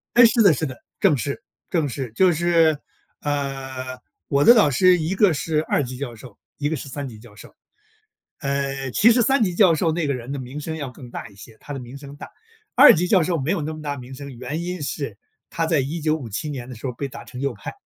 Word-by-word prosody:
哎， 240 -1 +9
是 230 +1 +3
的 200 -5 +7
是 155 +1 -1
的， 130 -3 -7 0.2
正 185 -8 +4
是， 140 +2 -4 0.3
正 160 -5 +1
是。 130 -3 -5
就 180 +7 +4
是， 165 -1 +3 0.4
呃， 135 -3 -4 0.3
我 140 0 +2
的 240 - +9
导 210 -10 +5
师 180 +6 +5
一 160 +4 -1
个 195 -2 +4
是 155 +2 0
二 145 - 0
级 130 -1 -6
教 125 -2 -5
授， 115 -1 -13 0.2
一 145 - 0
个 160 - -1
是 140 - -7
三 140 +1 -5
级 110 -3 -11
教 110 -1 -16
授。 - - -14 0.9
呃， 140 -1 -2
其 220 - +5
实 240 +1 +4
三 270 +2 +3
级 180 -5 +1
教 175 -3 +5
授 165 +1 +1
那 160 0 -1
个 140 - 0
人 125 0 -6
的 140 - -3
名 130 +3 -7
声 160 +1 -5
要 140 -5 -5
更 125 -1 -12
大 - - -7
一 - - -19
些， 110 +3 -14
他 145 - -8
的 140 - -4
名 125 +2 -10
声 140 0 -10
大， - - -9 0.5
二 275 +4 +9
级 175 +2 0
教 190 -3 +4
授 170 +1 0
没 145 +5 0
有 170 -6 -1
那 155 - -3
么 155 - -8
大 145 -2 -4
名 130 0 -9
声， 140 -2 -9
原 140 +7 -4
因 180 -2 -4
是 140 -5 -4 0.3
他 165 - -2
在 160 -2 +2
1957 150 -3 -2
年 130 -4 -6
的 125 - -7
时 115 - -15
候 125 - -2
儿 - - -17
被 140 +3 -4
打 - - -10
成 125 - -9
右 140 -2 -1
派， 100 - -7
145 Hz, 265 characters per minute, -22 LUFS, 130-165 Hz, 0.9 s, 哎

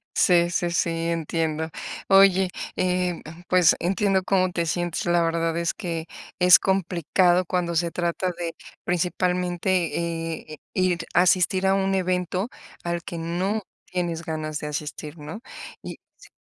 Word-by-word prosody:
Sí 175 -1 +4
sí 175 -1 -1
sí, 170 - +1 0.2
entiendo. 160 -1 -1 0.4
Oye, 195 -1 +6 0.3
eh, 180 -1 0 0.3
pues 180 -2 +5
entiendo 190 +1 +1
cómo 185 -1 +2
te 170 -1 -1
sientes, 175 +1 -2
la 175 0 +3
verdad 165 0 0
es 170 0 0
que 165 -4 -4 0.3
es 180 0 +8
complicado 180 -1 +2
cuando 175 -1 -1
se 170 0 +1
trata 175 +1 -1
de 170 -1 -4 0.3
principalmente, 175 -2 -1
eh, - - -9 0.2
ir 185 -2 +1
asistir 185 +2 +3
a 195 - +4
un 195 0 +1
evento 185 +3 0 0.3
al 170 -1 -2
que 170 - -6
no 185 +6 -1 0.2
tienes 170 -2 -3
ganas 155 -1 -3
de 150 - -5
asistir, 150 +1 -5
¿no?, 155 +9 -7 0.4
y - - -7 0.2
sí - - -17
175 Hz, 140 wpm, -24 LUFS, 165-185 Hz, 0.4 s, es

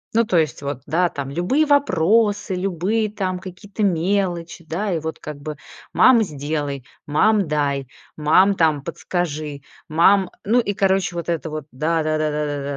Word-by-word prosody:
Ну, 230 - +5
то 190 -5 +1
есть, 155 -3 0
вот, 140 -2 -4
да, 175 +2 +2
там 140 -3 -5
любые 195 - +1
вопросы, 210 - +2
любые 195 +4 -1
там 190 -3 -2
какие-то 185 +3 -6
мелочи, 175 -2 -1
да, 190 +6 -2
и 170 - 0
вот 160 +1 -5
как 150 -2 -7
бы: 150 +1 -6 0.4
"Мама, 245 -3 +6
сделай! 145 - -4 0.2
Мам, 200 +6 +2
дай! 140 -3 -1 0.3
Мам, 175 +6 +4
там 160 -5 +2
подскажи! 155 -2 -4 0.3
Мам!" 185 +5 +4
Ну 230 +5 +3
и, 205 - -2
короче, 190 -2 +1
вот 170 0 -4
это 165 -2 -2
вот: 155 -2 -5
"Да 160 +4 0
да 155 0 0
да 155 0 0
да 150 0 -1
да 140 - -5
170 Hz, 170 wpm, -21 LUFS, 150-195 Hz, 0.4 s, Мама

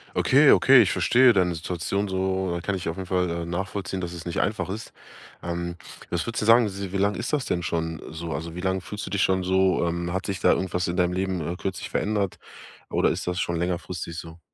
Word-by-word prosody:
Okay, - - +5
okay. - - +7
Ich - - 0
verstehe 125 0 +5
deine 90 -3 +2
Situation 90 +5 -2
so, 95 -1 -1
äh, 85 - -3
kann 100 +2 -1
ich 90 - -5
auf 80 - -3
jeden 95 -1 -5
Fall, 90 -1 +1
äh, 85 0 -3
nachvollziehen, 95 +1 -3
dass 90 -1 -4
es 85 -2 -8
nicht 85 - -2
einfach 105 -2 -1
ist. 105 +4 -6 0.5
Ähm. 85 0 -4 0.4
Was 85 +4 -1
würdest 115 -1 -2
du - - -1
sagen, 115 -1 +6
si 100 -1 -6
wie 100 - -1
lange 100 +1 +1
ist 120 +5 -4
das 145 -3 +1
denn 85 -1 -1
schon 80 -1 -2
so? 80 +1 -6
Also, 80 +1 -4
wie 90 - -6
lange 95 0 0
fühlst 105 +2 -6
du - - -5
dich 100 -2 +1
schon 95 0 +2
so? 95 0 +2
Ähm. 85 +1 -2
Hat 95 +1 -2
sich 95 -2 -3
da - - +4
irgendwas 90 -1 0
in 85 - -2
deinem 90 -1 +2
Leben, 95 -1 -1
äh, 85 +3 -3
kürzlich 95 0 -4
verändert? 100 -3 -1 0.5
Oder - - +2
ist - - -3
das 90 0 -2
schon 85 -1 -1
längerfristig 85 -1 -3
so? 80 -1 -9
90 Hz, 240 wpm, -25 LUFS, 85-95 Hz, 0.5 s, okay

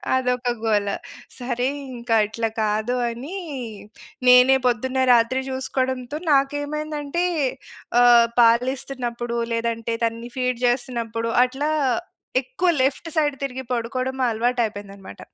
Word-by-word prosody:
అదొక 250 -1 0
గోల. 205 -2 +1 0.5
సరే 245 0 -1 0.3
ఇంక 235 -1 -7
అట్ల 220 +2 -3 0.2
కాదు 215 +3 0
అనీ, 260 +11 -7 0.9
నేనే 250 +1 +7
పొద్దున్న, 255 +2 0
రాత్రి 240 +3 +3
చూసుకోడంతో 260 +1 -2
నాకు 275 0 +3
ఏమైందంటే, 300 +2 -3 0.8
ఆహ్, 240 -1 +7
పాలిస్తున్నప్పుడు 240 0 0 0.2
లేదంటే, 230 0 -2
తన్ని 230 +1 -4
ఫీడ్ 250 -1 0
చేస్తన్నప్పుడు, 235 -2 -1
అట్లా 270 +4 -3 0.7
ఎక్కువ 380 -8 -1
లెఫ్ట్ 275 +5 -1
సైడ్ 295 -3 +2
తిరిగి 260 -1 -4
పడుకోడం 255 +3 -2
అలవాటైపోయింది 220 -3 -1
అనమాట. 195 -1 -12
250 Hz, 105 wpm, -23 LUFS, 230-265 Hz, 0.9 s, నేనే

